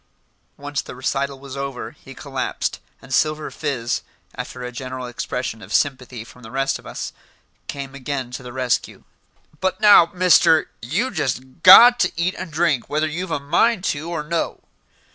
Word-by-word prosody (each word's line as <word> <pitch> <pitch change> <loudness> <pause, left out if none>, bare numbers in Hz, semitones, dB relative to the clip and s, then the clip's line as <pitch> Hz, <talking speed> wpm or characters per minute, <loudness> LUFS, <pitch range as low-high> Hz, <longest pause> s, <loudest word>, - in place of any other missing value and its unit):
Once 145 0 -3
the - - -10
recital 135 +1 -2
was 140 -1 -9
over, 140 -2 -5
he - - -14
collapsed, - - -3 0.2
and 135 -1 -8
Silver 155 +2 +1
Fizz, 130 -6 -2 0.3
after 125 - -7
a 125 - -5
general 130 +1 -6
expression 120 -1 -4
of - - -12
sympathy 130 -5 -1
from 125 +2 -16
the 110 - -11
rest 135 +2 -1
of - - -14
us, - - -6 0.5
came 140 -1 -6
again 135 -2 -4
to 125 - -6
the 125 -1 -9
rescue. 125 -1 -2 0.6
"But 190 0 -1
now, 205 -5 +7
Mister, 180 -3 +4
you 165 - -1
jest 130 - -3
got 240 +7 +10
to - - +2
eat 170 +2 0
and 165 - -6
drink 155 -5 0
whether 155 +2 +1
you've 170 +4 -4
a 160 - -1
mind 180 +9 +2
to, 155 +3 -6
or 165 -3 -3
no." 165 +2 -2
140 Hz, 170 wpm, -21 LUFS, 130-165 Hz, 0.6 s, got